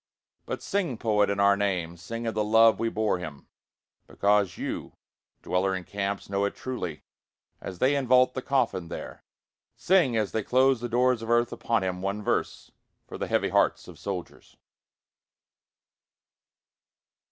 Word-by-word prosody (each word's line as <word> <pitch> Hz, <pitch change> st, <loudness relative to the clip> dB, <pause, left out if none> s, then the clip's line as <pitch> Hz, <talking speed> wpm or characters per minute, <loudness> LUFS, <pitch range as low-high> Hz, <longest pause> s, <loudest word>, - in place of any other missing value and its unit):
But -, -, -4 dB
sing 185 Hz, -, -1 dB
poet 105 Hz, -3 st, +2 dB
in 100 Hz, 0 st, -1 dB
our 100 Hz, 0 st, +5 dB
name, 90 Hz, -4 st, -1 dB
Sing 115 Hz, +7 st, -6 dB
of 115 Hz, -, -1 dB
the 105 Hz, 0 st, 0 dB
love 110 Hz, +1 st, +5 dB
we 115 Hz, -, 0 dB
bore 110 Hz, -4 st, 0 dB
him 75 Hz, -5 st, -8 dB, 0.6 s
because 100 Hz, -2 st, +1 dB
you, -, -, -5 dB, 0.5 s
dweller 95 Hz, +1 st, 0 dB
in 95 Hz, -, -5 dB
camps, 100 Hz, +1 st, -3 dB
know 100 Hz, 0 st, -1 dB
it 100 Hz, -, -3 dB
truly. 90 Hz, -12 st, -5 dB, 0.6 s
As 95 Hz, -, -7 dB
they 130 Hz, +9 st, +3 dB
invault 130 Hz, -2 st, +3 dB
the 130 Hz, -, -3 dB
coffin 120 Hz, -11 st, 0 dB
there, -, -, -8 dB, 0.5 s
Sing 165 Hz, -11 st, +3 dB
as 105 Hz, -2 st, 0 dB
they 110 Hz, -, -1 dB
close 130 Hz, +2 st, +3 dB
the 120 Hz, -, -3 dB
doors 125 Hz, 0 st, +2 dB
of 115 Hz, -, -6 dB
earth 120 Hz, 0 st, +3 dB
upon 115 Hz, -4 st, -1 dB
him 90 Hz, -1 st, -3 dB
one 100 Hz, +2 st, -3 dB
verse, -, -, -2 dB, 0.4 s
For -, -, -8 dB
the -, -, -2 dB
heavy -, -, +1 dB
hearts -, -, +1 dB
of -, -, -12 dB
soldiers. 95 Hz, -4 st, -7 dB
105 Hz, 155 wpm, -27 LUFS, 95-120 Hz, 0.6 s, our